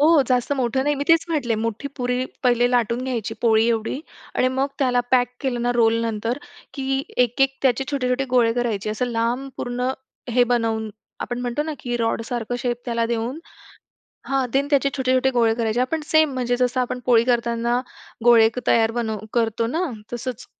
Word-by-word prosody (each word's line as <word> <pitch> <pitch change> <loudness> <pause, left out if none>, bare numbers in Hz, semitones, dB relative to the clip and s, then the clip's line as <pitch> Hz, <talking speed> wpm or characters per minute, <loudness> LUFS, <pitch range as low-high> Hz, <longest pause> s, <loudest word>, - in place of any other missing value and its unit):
हो, 305 -1 +6
जास्त 250 +1 +1
मोठं 255 +1 +1
नाही, 295 - +2
मी - - 0
तेच 330 0 +5
म्हटले 280 -8 0
मोठी 230 +5 -3
पुरी 250 0 0 0.3
पहिले 245 -1 +4
लाटून 240 0 +1
घ्यायची 230 -4 -3
पोळी 225 -1 +4
एवढी. 225 +3 -1 0.3
आणि 255 - +2
मग 270 +1 +2
त्याला 250 -3 +2
पॅक 250 -2 +4
केलं 245 -3 -1
ना 245 - +1
रोल 225 -1 +4
नंतर, 230 +3 -2 0.4
की 270 -1 -1 0.2
एक-एक 270 +3 0
त्याचे 265 0 +2
छोटे-छोटे 270 -1 0
गोळे 240 -2 +4
करायचे, 225 -4 -1
असं 215 +4 -1
लांब 240 +3 -1
पूर्ण 250 +1 -2 0.4
हे 245 +1 +4
बनवून 225 -2 0 0.3
आपण 245 0 -3
म्हणतो 245 +4 -1
ना 315 0 -4
की 240 -1 -2
रॉड 230 -1 0
सारखं 245 -1 -3
शेप 240 0 -1
त्याला 235 -1 0
देऊन. 235 +4 -2 0.9
हां 270 -1 +1
देन 275 +1 +2
त्याचे 280 -1 +3
छोटे-छोटे 260 0 +2
गोळे 230 -3 +2
करायचे. 225 0 0
आपण 285 +6 0
सेम 315 -2 +3
म्हणजे 245 -1 0
जसं 250 +1 +1
आपण 250 0 -2
पोळी 235 -2 +5
करताना, 235 0 +1 0.4
गोळे 230 -2 +7 0.2
तयार 225 -1 +4
बनव 220 -2 -2
करतो 230 -1 +1
ना 320 +7 -1 0.2
तसंच. 245 0 -5
245 Hz, 180 wpm, -22 LUFS, 230-260 Hz, 0.9 s, गोळे